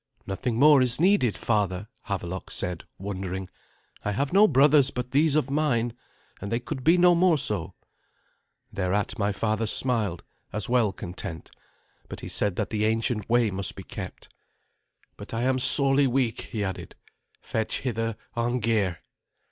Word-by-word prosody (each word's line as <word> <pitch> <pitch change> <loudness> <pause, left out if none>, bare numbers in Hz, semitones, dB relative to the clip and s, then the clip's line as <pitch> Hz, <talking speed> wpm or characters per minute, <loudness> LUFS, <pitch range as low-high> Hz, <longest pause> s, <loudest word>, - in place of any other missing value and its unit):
"Nothing 115 +5 -3
more 145 +1 +6
is 125 0 +2
needed, 175 - +3
father," 100 -3 -1 0.2
Havelok 95 -2 -4
said, 90 -2 -2
wondering. 95 -1 -5 0.5
"I 105 - -1
have 140 - -2
no 205 +2 +7
brothers 140 -2 +5
but 125 -2 -5
these 150 +1 +3
of 140 -3 +1
mine, 125 -6 +1 0.5
and 100 - -5
they 115 - +1
could 130 +1 -6
be 165 +6 +5
no 175 0 +6
more 175 -1 +4
so." 105 - -2 1.0
Thereat 100 +4 -1
my 100 0 +1
father 110 +2 -1
smiled, 105 -8 +1 0.3
as 105 -2 -3
well 120 -4 +2
content, 90 -3 -7 0.6
but - - -8
he - - -7
said 100 -3 +1
that 105 +1 -3
the 110 -1 0
ancient 110 -1 0
way 120 -2 +3
must 95 0 -1
he - - -7
kept. - - -9 0.8
"But - - -8
I 115 - -1
am 130 0 +1
sorely 140 +1 +3
weak," 125 -2 -1
he 105 -3 -2
added. 95 -2 -5 0.4
"Fetch 110 -1 -2
hither 115 -3 -2 0.2
Arngeir." 115 -7 0
115 Hz, 155 wpm, -26 LUFS, 100-130 Hz, 1.0 s, no